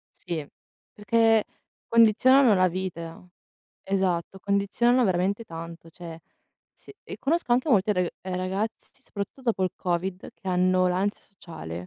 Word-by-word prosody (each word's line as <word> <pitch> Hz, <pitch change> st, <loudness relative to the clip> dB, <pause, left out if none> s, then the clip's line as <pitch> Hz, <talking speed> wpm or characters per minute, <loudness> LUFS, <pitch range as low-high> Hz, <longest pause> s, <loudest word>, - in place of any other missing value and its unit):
Sì, 160 Hz, -4 st, -5 dB, 0.5 s
perché 225 Hz, +1 st, +3 dB, 0.4 s
condizionano 230 Hz, +2 st, +5 dB
la 185 Hz, -1 st, +3 dB
vita. 170 Hz, -1 st, -6 dB, 0.6 s
Esatto, 190 Hz, -1 st, -1 dB
condizionano 205 Hz, +6 st, +2 dB
veramente 190 Hz, +4 st, 0 dB
tanto, 165 Hz, -2 st, -9 dB
cioè, 165 Hz, -1 st, -10 dB, 0.5 s
s -, -, -27 dB, 0.3 s
conosco 295 Hz, -3 st, 0 dB
anche 255 Hz, +5 st, +2 dB
molti 210 Hz, -3 st, +3 dB
rag 180 Hz, -2 st, 0 dB
eh 185 Hz, -1 st, -4 dB
ragazzi, 190 Hz, +4 st, -3 dB
soprattutto 200 Hz, +6 st, -7 dB
dopo 225 Hz, -6 st, 0 dB
il 185 Hz, -, +1 dB
Covid, 180 Hz, +1 st, -3 dB
che 190 Hz, -, -9 dB
hanno 185 Hz, 0 st, +2 dB
l'ansia 190 Hz, +3 st, -1 dB
sociale. 170 Hz, -, -11 dB
190 Hz, 125 wpm, -26 LUFS, 180-220 Hz, 0.6 s, condizionano